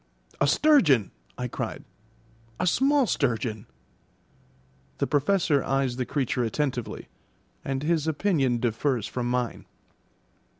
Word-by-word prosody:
"A 140 - +3
sturgeon," 150 - +4 0.3
I 125 - -3
cried; - - -5 0.8
"a - - 0
small 275 +8 +3
sturgeon." 115 - -1 1.3
The - - 0
Professor 150 -1 +2
eyes 135 -2 0
the 125 - -2
creature 130 -3 -1
attentively, 125 +1 -3 0.6
and 135 0 -3
his 160 -1 +1
opinion 150 -6 +1
differs 120 0 0
from 120 0 -3
mine. 125 -1 -2
135 Hz, 110 wpm, -26 LUFS, 120-160 Hz, 1.3 s, sturgeon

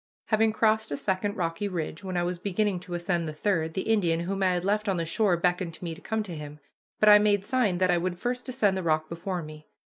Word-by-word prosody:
Having 220 0 +3
crossed 220 0 +2
a 145 - -1
second 200 +3 -1
rocky 175 +3 -2
ridge, 170 -1 -4
when 185 -2 -3
I 175 - +1
was 175 0 -2
beginning 200 0 0
to 175 0 -7
ascend 175 -1 -1
the 155 - -4
third, 160 -2 0
the 190 - -1
Indian, 175 -7 +1
whom 195 +3 -3
I 185 -1 +3
had 180 0 -2
left 210 +1 +1
on 190 - +1
the 165 - -1
shore, 185 +1 +2
beckoned 175 -1 0
to - - -13
me 170 -2 -3
to - - -12
come 220 -1 -2
to 180 -5 -7
him, 150 -1 -8 0.4
but 215 - +4
I 210 0 +9
made 205 -1 +2
sign 235 -8 +1
that 185 0 +3
I 175 - +3
would 175 0 -2
first 250 +6 -3
ascend 215 -7 +2
the 190 - -2
rock 155 -2 0
before 175 +1 -4
me. 155 0 -11
185 Hz, 260 wpm, -27 LUFS, 170-210 Hz, 0.4 s, I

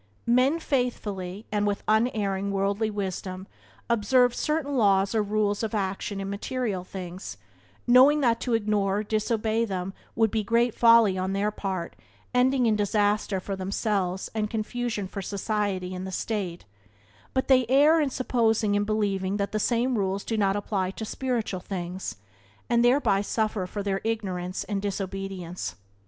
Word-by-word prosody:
Men 255 +6 +3
faithfully, 215 - -2
and 210 -1 +1
with 205 -1 -1
unerring 210 -3 +1
worldly 200 +2 0
wisdom, 190 -2 -4 0.4
observe 240 +2 +3
certain 300 -1 -1
laws 200 -4 +3
or 220 - +2
rules 205 0 0
of 220 -1 -2
action 195 0 -2
in 195 - -4
material 205 -1 -2
things, 185 0 -7 0.5
knowing 260 +5 +6
that 235 -3 +2
to 240 -3 0
ignore 205 -2 +1
or 210 - -1
disobey 220 +1 0
them 190 -3 -3 0.2
would 225 -2 +3
be 220 -1 0
great 230 +2 +2
folly 230 -5 +5
on 190 +1 -1
their 205 +2 0
part, 190 -5 -4 0.4
ending 250 +1 +3
in 220 -2 +3
disaster 205 -1 +1
for 195 +1 -4
themselves 190 -1 -1
and 215 -1 -1
confusion 225 -2 -2
for 195 +1 -6
society 200 -2 -2
and 185 +1 -5
the - - -6
state, 185 -3 -3 0.7
but 260 - +1
they 255 -3 +4
err 295 +5 +5
in 290 - +1
supposing 225 -5 +1
and 205 0 +1
believing 200 -2 0
that 200 -1 -2
the 215 - -1
same 240 +3 +1
rules 195 0 -1
do 225 - -1
not 200 -2 +2
apply 200 -2 -1
in 220 - -3
spiritual 235 -5 -2
things, 180 0 -5 0.5
and 235 0 +3
thereby 240 -6 +3
suffer 215 -2 -1
for 200 +2 -4
their 195 -1 -1
ignorance 190 -5 -2
and 200 -2 -3
disobedience. 195 -3 -4
205 Hz, 155 wpm, -26 LUFS, 195-230 Hz, 0.7 s, knowing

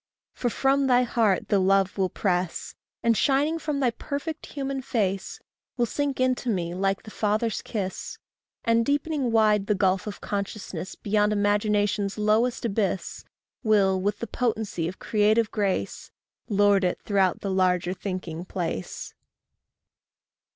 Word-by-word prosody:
for 245 - -1
from 270 +3 +2
thy 250 -1 +5
heart 225 -5 +1
the 200 - +4
love 195 0 +3
will 190 -2 +1
press, 180 -2 -1 0.3
And 230 -1 +4
shining 290 +6 +2
from 300 -3 -2
thy 255 -3 +2
perfect 290 +6 -5
human 275 -1 -3
face, 200 -7 -2 0.4
Will 240 - +3
sink 280 +3 -2
into 255 -1 +1
me 175 -5 -1
like 195 +1 0
the 215 - -10
father's 215 +2 0
kiss; 195 -5 -4 0.5
And 230 0 +3
deepening 285 -1 0
wide 210 -3 +3
the 210 - +2
gulf 190 0 +1
of 210 - -6
consciousness 200 -3 -4
Beyond 210 0 +1
imagination's 205 0 +1
lowest 225 +4 +2
abyss, 200 -3 -2 0.4
Will, 195 -4 +3
with 205 +2 0
the 235 - -4
potency 220 -8 -1
of 180 - -6
creative 215 +1 +2
grace, 200 -3 -2 0.4
Lord 205 -1 +4
it 180 - 0
throughout 195 -3 +1
the 200 - -2
larger 180 -1 +2
thinking 185 -3 -5
place. 170 - -4
210 Hz, 140 wpm, -26 LUFS, 190-235 Hz, 0.5 s, thy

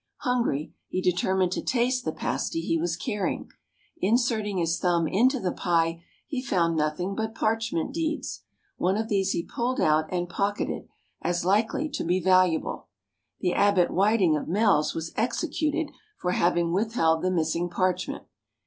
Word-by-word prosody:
Hungry, 235 - 0
he - - -2
determined 185 0 +1
to - - -1
taste 250 0 0
the - - 0
pasty 330 - -2
he 165 - 0
was 165 +1 -1
carrying. 205 +2 -3 0.5
Inserting 225 - +1
his 170 -1 0
thumb 170 -2 +2
into 250 - +3
the 185 -5 -1
pie, 165 -1 0 0.2
he 265 -3 -3
found 170 -9 +1
nothing 155 +5 -1
but 220 +2 -3
parchment 220 -7 -1
deeds. 315 -1 -3 0.4
One 190 +3 +1
of 220 +1 -2
these 195 -2 +1
he 170 - -1
pulled 250 +2 -2
out 155 0 +2
and 175 -1 -1
pocketed, 200 +3 -2 0.3
as 175 0 -1
likely 220 +10 +2
to - - -3
be 180 +2 +1
valuable. 185 -2 +2 0.5
The 180 -2 +1
Abbot 200 -3 +3
Whiting 195 -4 +3
of 150 - -3
Mells 195 -4 +2
was 165 0 -4
executed 300 +5 -1 0.3
for 180 - -1
having 170 -1 +2
withheld 185 -6 +2
the 185 - +1
missing 170 0 0
parchment. 185 0 -1
185 Hz, 155 wpm, -26 LUFS, 170-225 Hz, 0.5 s, into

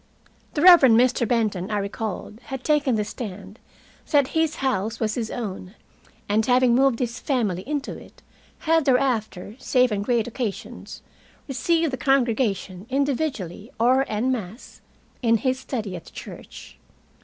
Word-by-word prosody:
The 295 - 0
Reverend 280 -11 +8
Mr. 250 -1 +2
Benton, 210 -5 0
I 210 - -1
recalled, 210 +1 -4
had 265 -2 -6
taken 290 -5 +2
the 210 -1 0
stand 205 -1 -8 0.5
that 285 -4 +3
his 320 -1 0
house 225 -4 -1
was 215 -2 0
his 225 -2 -3
own, 195 -4 -6 0.5
and 215 +2 +2
having 250 +1 +4
moved 265 -1 +3
his 240 -1 -3
family 215 -10 -1
into 290 -2 -3
it, - - -17 0.4
had 325 -1 +2
thereafter, 235 -7 0
save 255 -2 +2
on 205 -1 -1
great 230 +1 +1
occasions, 235 -4 -6 0.4
received 320 +3 0
the - - -1
congregation 230 -8 0
individually 265 - -2
or 255 +3 +4
en 220 +5 0
masse, 220 -1 -6 0.4
in 230 -2 +3
his 260 +3 -1
study 225 -8 -4
at 175 - -9
the - - -14
church. - - -11
240 Hz, 145 wpm, -24 LUFS, 210-265 Hz, 0.5 s, Reverend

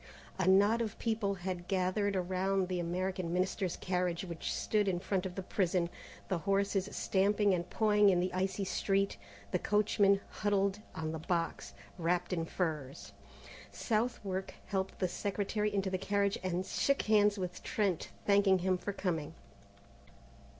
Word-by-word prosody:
A 185 - +1
knot 205 +5 +5
of 220 -2 -3
people 220 -3 0
had 180 -1 -5
gathered 195 +2 +1
around 185 +1 0
the 180 -1 -1
American 180 0 -2
Minister's 185 0 0
carriage, 180 -1 -1
which 170 -2 -4
stood 210 -2 +1
in 185 -2 +1
front 190 0 -1
of 180 - -9
the 190 - -4
prison, 180 -2 0 0.4
the 185 -3 -1
horses 195 +2 +1
stamping 200 +1 +2
and 175 0 -2
pawing 210 -2 +4
in 180 -2 +3
the 185 +1 -1
icy 190 +2 -1
street, 195 - 0 0.3
the - - +1
coachman 205 -1 +3
huddled 200 -1 0 0.2
on 155 -1 -3
the 160 - -4
box, 170 0 -2 0.2
wrapped 175 +2 0
in 165 -2 -1
furs. 155 -6 -3 0.6
Southwark 215 -4 -2
helped 190 -1 -2
the 185 - +1
Secretary 205 +3 -1
into 195 -2 -1
the 185 - -1
carriage, 200 +1 +1
and 185 0 -1
shook 275 +8 +1
hands 210 -1 +4
with 180 -1 -4
Trent, 195 -6 -1 0.2
thanking 200 -1 +5
him 185 -1 +2
for 200 - -4
coming. 165 -6 -2
190 Hz, 150 wpm, -33 LUFS, 180-200 Hz, 0.6 s, knot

